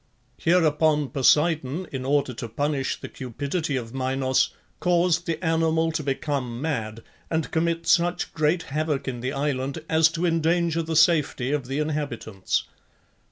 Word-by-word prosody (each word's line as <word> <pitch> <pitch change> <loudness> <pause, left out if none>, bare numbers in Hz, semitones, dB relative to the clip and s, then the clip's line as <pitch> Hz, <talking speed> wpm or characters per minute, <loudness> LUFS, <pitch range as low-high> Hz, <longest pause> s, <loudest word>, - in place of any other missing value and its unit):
Hereupon 155 -4 +3
Poseidon, 150 +3 +2
in 130 -2 -4
order 140 -2 +1
to 115 0 -6
punish 140 +2 -1
the - - -7
cupidity 140 +5 -3
of 120 -2 -4
Minos, 130 0 +1 0.3
caused 175 -1 +2
the 165 -2 0
animal 160 0 +2
to 160 - -2
become 135 -4 -2
mad, 115 -7 -3 0.3
and 160 -1 -1
commit 165 +1 0
such 175 +1 +2
great 155 +2 +1
havoc 150 -1 -2
in 125 -2 -3
the 125 +2 -2
island 140 +1 -2
as 160 0 +4
to 170 +2 -1
endanger 165 0 +1
the 160 0 -3
safety 150 -5 +3
of 145 -4 -1
the 135 +2 -3
inhabitants. 145 -10 -2
150 Hz, 145 wpm, -25 LUFS, 135-165 Hz, 0.3 s, as